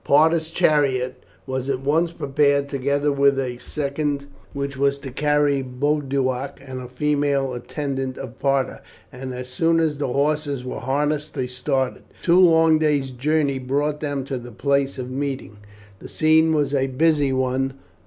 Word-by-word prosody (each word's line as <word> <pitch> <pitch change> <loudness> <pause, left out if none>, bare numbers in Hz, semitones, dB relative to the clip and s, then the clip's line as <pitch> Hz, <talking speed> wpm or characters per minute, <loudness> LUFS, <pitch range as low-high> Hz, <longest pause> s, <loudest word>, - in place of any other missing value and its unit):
Parta's 160 +2 +3
chariot 130 -6 +1 0.2
was 130 0 -3
at 130 -1 -1
once 160 +5 +1
prepared, 140 -2 +1
together 140 +1 0
with 140 -1 +3
a 125 -2 -2
second, 140 0 -2 0.3
which 140 0 -4
was 140 +1 +1
to 140 -1 -8
carry 145 0 +2
Boduoc 135 0 -1
and 130 -1 -7
a 125 - -7
female 140 0 0
attendant 135 +1 -4
of 130 -2 -8
Parta, 135 -1 0 0.3
and 130 0 -7
as 125 0 -6
soon 165 +5 +2
as 155 -3 0
the 145 - 0
horses 140 0 0
were 125 - -4
harnessed 150 +3 -1
they 130 - -1
started. 125 +1 -2 0.2
Two 175 +1 +5
long 165 -3 +5
days' 145 -4 +1
journey 140 +1 0
brought 145 +3 -1
them 145 -3 -2
to 135 -2 -3
the 120 0 -10
place 140 +3 0
of 130 -1 -5
meeting. 135 -5 -4 0.4
The - - -10
scene 160 0 +4
was 145 -3 +1
a 135 -1 +2
busy 145 +1 +2
one. 130 +1 0
140 Hz, 160 wpm, -22 LUFS, 130-150 Hz, 0.4 s, Two